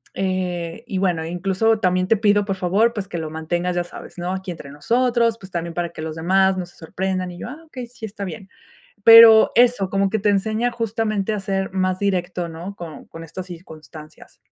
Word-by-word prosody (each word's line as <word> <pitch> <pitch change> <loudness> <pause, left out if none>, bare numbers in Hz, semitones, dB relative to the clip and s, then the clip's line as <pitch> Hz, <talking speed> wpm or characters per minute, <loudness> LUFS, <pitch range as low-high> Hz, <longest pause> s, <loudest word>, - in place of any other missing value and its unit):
eh, 185 0 -3
y, 195 -6 -3
bueno, 175 -4 0
incluso 195 +6 0
también 185 0 +1
te 225 - +3
pido, 205 -1 +3
por 195 -2 -2
favor, 200 +6 +2
pues 200 -2 -4
que 170 -3 -5
lo 155 -1 -4
mantengas, 175 +3 -2
ya 175 - 0
sabes, 175 - -11
¿no?, 175 +1 -3
aquí 190 0 -6
entre 145 -5 -9
nosotros, 235 - +1
pues, 190 0 -13
también 170 -1 -4
para 175 -1 -2
que 170 - -10
los 160 -1 -5
demás 190 +3 +2
no 180 - -3
se 175 - -20
sorprendan", 185 +2 -3
y 175 - -11
yo: - - -6
"Ah, 305 +5 -10
okey, 255 -5 -7
sí, 235 -2 -9
está 205 -1 -7
bien". 185 +2 -8 0.6
Pero 225 -1 +9
eso, 240 -6 +3
como 195 0 +1
que 220 - 0
te 210 - +1
enseña 220 +4 0
justamente 220 -2 -2
a 210 - -3
ser 195 -1 -2
más 185 -1 0
directo, 180 -3 -1
¿no?, 175 +5 -8
con 165 -5 -9
con 165 0 -10
estas 180 +3 -8
circunstancias. 160 -3 -13
190 Hz, 210 wpm, -21 LUFS, 175-215 Hz, 0.6 s, Pero